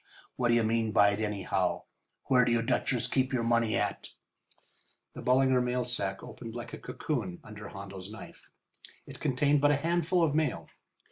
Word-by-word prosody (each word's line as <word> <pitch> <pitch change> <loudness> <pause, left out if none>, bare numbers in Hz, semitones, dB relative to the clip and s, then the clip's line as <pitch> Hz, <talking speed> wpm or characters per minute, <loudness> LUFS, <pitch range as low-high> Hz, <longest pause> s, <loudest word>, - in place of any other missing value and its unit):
What 125 - +1
d'you 120 -1 +4
mean 110 0 +1
by 100 0 +6
it, 100 - -3
anyhow? 95 -4 -1 0.4
Where 125 -1 +4
do 120 - +1
you 115 -1 +2
Dutchers 120 +1 +1
keep 130 0 0
your 125 -3 0
money 115 -1 +2
at?" - - -2 1.0
The - - -8
Ballinger 130 0 +3
mail 125 0 0
sack 100 -6 -1
opened 115 -1 -9
like 120 -1 -7
a - - -6
cocoon 120 - -4
under 105 -1 -9
Hondo's 95 -1 -8
knife. 110 +1 -12 0.6
It - - -11
contained 140 +2 +2
but 145 - +5
a 145 - +4
handful 170 +3 +1
of 155 -4 +2
mail. 150 -4 -1
120 Hz, 175 wpm, -30 LUFS, 105-130 Hz, 1.0 s, by